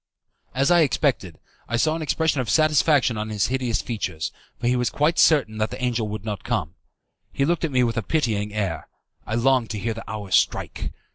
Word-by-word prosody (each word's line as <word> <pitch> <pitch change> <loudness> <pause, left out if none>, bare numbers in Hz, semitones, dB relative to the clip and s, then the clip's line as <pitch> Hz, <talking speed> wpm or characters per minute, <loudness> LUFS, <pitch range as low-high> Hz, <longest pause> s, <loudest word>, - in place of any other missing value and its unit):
As 135 +5 +2
I 175 - +6
had 160 - +6
expected, 115 - -1 0.3
I 120 - -1
saw 155 +6 +2
an 165 - -4
expression 155 -2 +1
of 125 - -5
satisfaction 150 -6 +3
on 110 +1 -3
his 105 -1 0
hideous 125 -4 -1
features, 95 -9 -3 0.3
for - - -5
he 125 +1 +3
was 125 -1 +1
quite 155 +4 +1
certain 130 -9 +3
that 110 0 0
the - - -7
angel 120 -3 -1
would 105 -1 -6
not 105 -3 -4
come. 95 -9 -2 0.6
He 140 - 0
looked 170 +3 0
at 160 - -3
me 125 -1 +3
with 115 -1 -1
a - - +1
pitying 105 -6 -1
air. 95 -7 -3 0.4
I 110 - -2
longed 125 -1 +2
to 110 - -4
hear 115 +3 -2
the 115 - -9
hour 105 -3 -6
strike. - - 0
120 Hz, 215 wpm, -23 LUFS, 105-140 Hz, 0.6 s, I